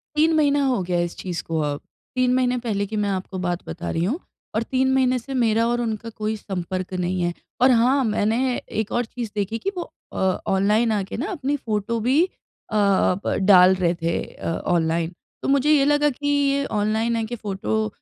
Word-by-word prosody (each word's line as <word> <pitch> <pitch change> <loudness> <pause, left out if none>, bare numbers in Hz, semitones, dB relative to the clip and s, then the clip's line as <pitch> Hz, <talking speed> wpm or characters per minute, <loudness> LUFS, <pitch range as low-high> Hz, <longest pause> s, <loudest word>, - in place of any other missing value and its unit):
3 315 +2 +4
महीना 290 -2 +3
हो 255 -7 +1
गया 175 0 0
इस 175 0 -3
चीज़ 175 -3 -4
को 165 -1 -2
अब। 145 -1 -2 0.4
3 255 -1 +2
महीने 250 -1 +2
पहले 215 -4 -1
की 215 - -5
मैं 205 -1 0
आपको 190 0 -3
बात 175 -1 -2
बता 80 +1 -5
रही 165 - -1
हूँ, 240 - -1 0.4
और 220 - +1
3 260 +2 +1
महीने 255 -1 +3
से 270 +3 -8
मेरा 230 -3 +2
और 240 0 0
उनका 230 -1 -3
कोई 215 0 -3
संपर्क 185 -2 -4
नहीं 180 0 -1
है। 175 0 0 0.3
और 255 +1 +7
हाँ, 255 +3 +4
मैंने 230 +3 +1
एक 220 0 -4
और 240 0 0
चीज़ 230 -1 -6
देखी 205 +2 -1
कि 395 - -2
वो 350 - -5 0.2
अ, - - -6 0.3
ऑनलाइन 210 +4 +2
आके 200 -3 -2
ना 270 - -2
अपनी 290 -5 -1
फ़ोटो 225 -2 -2
भी 260 +9 +3
अ 360 - -12
अ, 200 -3 +3
ब - - +1
डाल 185 -2 +7
रहे 175 -2 +1
थे 165 0 0
अ, - - -8 0.2
ऑनलाइन। 165 0 +1 0.3
तो - - -3
मुझे 280 +2 +3
ये 285 -3 +5
लगा 295 +1 +3
कि 290 +2 -5
ये 280 -1 +2
ऑनलाइन 220 +2 0
आके 225 +1 -3
फ़ोटो 150 - -2
220 Hz, 205 wpm, -23 LUFS, 185-255 Hz, 0.4 s, और